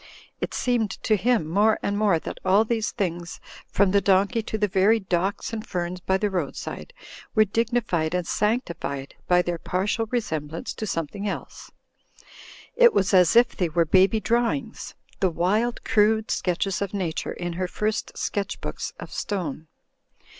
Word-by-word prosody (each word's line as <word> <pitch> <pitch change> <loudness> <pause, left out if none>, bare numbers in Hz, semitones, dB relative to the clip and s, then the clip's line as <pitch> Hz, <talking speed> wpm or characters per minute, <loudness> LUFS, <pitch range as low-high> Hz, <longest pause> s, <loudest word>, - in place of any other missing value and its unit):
It - - -3
seemed 240 -4 +1
to 215 - +3
him 225 -2 +1
more 205 +6 +3
and 200 - 0
more 205 -4 +3
that - - -7
all 195 +4 +4
these 225 -1 0
things, 175 -2 -3 0.3
from 195 -1 +2
the 200 0 +4
donkey 200 +4 +3
to 220 - -4
the 210 -1 +1
very 200 +4 +3
docks 190 +3 -2
and 220 -1 -3
ferns 180 -2 -3
by 190 +1 +1
the 205 +1 -1
roadside, 180 - -4 0.4
were 215 0 +6
dignified 215 -7 0
and 180 -1 -1
sanctified 170 - -2
by 180 0 +4
their 175 -1 -3
partial 210 +7 -1
resemblance 160 - -3
to 215 - -5
some 165 -4 -1
thing 200 +7 -6
else. - - -7 1.1
It 480 -1 +6
was 195 +1 +2
as 180 +2 +5
if 240 +1 +5
they 180 -3 0
were 165 +1 +2
baby 190 +6 +4
drawings: 235 +2 -1 0.2
the 190 - +3
wild, 205 +8 0
crude 220 +1 +2
sketches 185 +2 -1
of 200 0 -3
Nature 175 -5 -2
in 175 -1 -4
her 180 +1 -2
first 210 +3 -3
sketch 200 -1 -2
books - - -5
of - - -8
stone. 160 -6 -4
200 Hz, 165 wpm, -25 LUFS, 175-220 Hz, 1.1 s, were